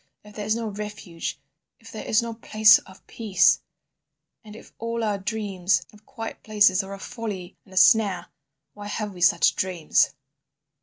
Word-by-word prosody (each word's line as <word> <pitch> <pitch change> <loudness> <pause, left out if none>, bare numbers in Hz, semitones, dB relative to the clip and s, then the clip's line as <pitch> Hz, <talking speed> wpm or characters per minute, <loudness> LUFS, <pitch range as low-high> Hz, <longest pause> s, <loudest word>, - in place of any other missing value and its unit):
If 210 0 -15
there 210 -1 -5
is 215 - +2
no 230 -1 -3
refuge, 205 -5 -6 0.4
if - - -14
there - - -7
is 225 +2 +2
no 230 0 -4
place 220 -1 +5
of 190 - -18
peace, 205 -6 +2 0.8
and 210 -1 -12
if - - -14
all 230 0 -3
our 205 -2 -1
dreams 200 -3 -1
of 210 0 -20
quiet 230 -5 -7
places 205 -3 +3
are 195 +1 -8
a - - -13
folly 210 -6 -6
and 190 - -17
a - - -7
snare, 185 -1 +4 0.5
why 205 0 -9
have 210 0 -4
we 180 - -11
such 180 +4 +4
dreams? 180 -4 +1
210 Hz, 170 wpm, -24 LUFS, 190-220 Hz, 0.8 s, place